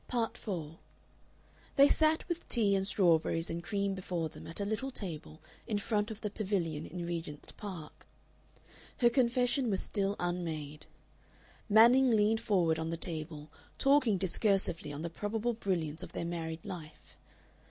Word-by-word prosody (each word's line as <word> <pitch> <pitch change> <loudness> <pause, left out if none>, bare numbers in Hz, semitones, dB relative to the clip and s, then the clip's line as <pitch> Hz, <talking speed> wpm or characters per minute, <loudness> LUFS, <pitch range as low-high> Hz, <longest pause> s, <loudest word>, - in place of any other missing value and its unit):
Part 235 -3 -1
4 165 -6 -5 1.0
They 280 0 +8
sat 315 +1 +2
with 345 -1 -4
tea 210 -5 +4
and 195 0 0
strawberries 165 -4 +2
and 170 +1 -4
cream 200 0 -1
before 180 -4 -3
them - - -11
at 165 - -2
a 200 - -1
little 220 +6 -2
table 160 - -6 0.2
in 215 -3 0
front 210 +1 0
of 220 -1 -7
the 210 - -3
pavilion 185 -8 -2
in 175 +1 -5
Regent's 165 -4 -5
Park. 185 -7 -9 0.9
Her 240 -1 +4
confession 250 0 +2
was 195 -2 +1
still 200 0 0
unmade. 160 -4 -3 0.8
Manning 240 +5 +7
leaned 220 0 +3
forward 175 -7 +2
on 160 0 -2
the 165 - -2
table, 155 -3 -5 0.3
talking 275 -7 +4
discursively 190 -4 +1
on 145 +2 -6
the 170 - -2
probable 220 +6 -1
brilliance 170 -8 -2
of - - -9
their - - -3
married 165 -1 -4
life. 155 -4 -9
190 Hz, 155 wpm, -32 LUFS, 165-220 Hz, 1.0 s, They